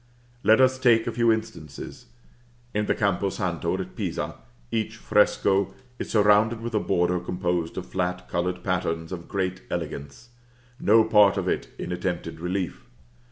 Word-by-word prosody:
Let 110 0 +5
us 130 0 +4
take 115 -3 +4
a - - -1
few 115 -1 +3
instances. 80 - -5 0.7
In 105 0 0
the - - +2
Campo 100 -1 +1
Santo 90 -5 -2
at - - -6
Pisa, - - -3 0.4
each 110 -1 -1
fresco 100 -2 +2 0.2
is - - -4
surrounded 105 +2 +4
with 115 0 -5
a 105 - +3
border 90 -1 +1
composed 90 -2 -2
of 90 - -4
flat 90 0 -3
colored 90 +1 -2
patterns 85 -3 -1
of 85 -2 -6
great 95 -1 -2
elegance 70 - -5 0.5
no 110 +2 +5
part 105 -3 +5
of - - -1
it - - -1
in - - -5
attempted 90 -2 -3
relief. 90 +1 -3
95 Hz, 155 wpm, -25 LUFS, 90-110 Hz, 0.7 s, Let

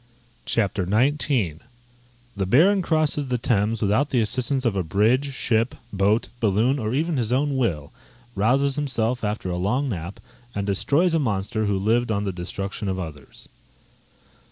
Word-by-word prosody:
CHAPTER 105 -3 0
XIX 110 - +1 0.8
_The 95 -2 -2
Baron 185 - +5
crosses 155 -4 +1
the 125 -1 0
Thames 110 -1 0
without 110 +9 +2
the 125 - +1
assistance 130 +4 +1
of 115 -4 +1
a 95 - +1
bridge, 110 - +1
ship, 115 -2 0 0.2
boat, 100 +3 +2
balloon, 115 +6 +2
or 110 -2 -2
even 160 +1 0
his 120 -2 -1
own 140 +2 +1
will: 85 - -1 0.4
rouses 135 +7 +2
himself 125 -4 0
after 105 -3 -2
a 90 - -2
long 125 +10 0
nap, 90 -2 -5 0.4
and 100 -1 -2
destroys 145 - +2
a 165 - +3
monster 110 -3 -1
who 100 -1 +1
lived 115 +5 +1
upon 100 -2 0
the 100 -2 -2
destruction 95 +3 -5
of 95 -1 -1
others. 80 -5 -9
110 Hz, 155 wpm, -23 LUFS, 100-135 Hz, 0.8 s, Baron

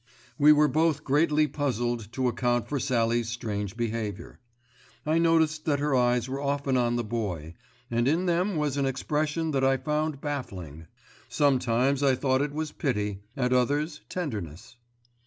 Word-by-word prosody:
We 150 +1 +7
were 150 0 +5
both 155 0 +1
greatly 150 +2 +3
puzzled 120 -6 -2
to 130 0 0
account 120 -1 0
for 145 - -2
Sallie's 120 -3 +1
strange 105 -3 -4
behaviour. 110 -3 -4 0.7
I 155 +2 +2
noticed 160 -2 +2
that 145 -3 +2
her 145 0 0
eyes 125 -1 +2
were 135 +1 -4
often 140 -1 0
on 120 -1 +2
the 120 - -1
Boy, 100 -8 -4 0.4
and 120 +1 +1
in 165 +6 +2
them 180 +3 +1
was 150 -2 -1
an 140 -1 +1
expression 150 +4 -1
that 135 -2 0
I 135 0 +3
found 150 +2 -2
baffling. 90 - -6 0.4
Sometimes 130 -1 +2
I 135 -2 +4
thought 130 0 +1
it 145 0 -1
was 155 0 -3
pity, 105 -7 -2 0.2
at 125 -1 +1
others 145 +5 0
tenderness. 105 - -5
135 Hz, 155 wpm, -27 LUFS, 120-150 Hz, 0.7 s, We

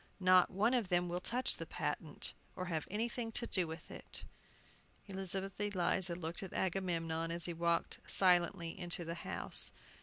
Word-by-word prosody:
"Not 185 -1 +6
one 210 +6 +2
of 240 -6 +2
them 175 -1 +2
will 175 +1 -1
touch 245 +7 +1
the - - -6
patent, - - -2 0.2
or 185 - -3
have 160 -4 -2
anything 230 +3 -1
to 235 - +3
do 185 -6 +1
with 160 +1 -8
it." - - -7 0.8
Elizabeth 195 0 -3
Eliza 185 -3 +1
looked 170 -1 -4
at 190 - -6
Agamemnon, 165 -3 0
as 170 0 0
he 175 - -2
walked 170 0 +1
silently 175 -2 +3
into 175 -1 -2
the 165 - -3
house. 170 - 0
180 Hz, 160 wpm, -36 LUFS, 170-195 Hz, 0.8 s, Not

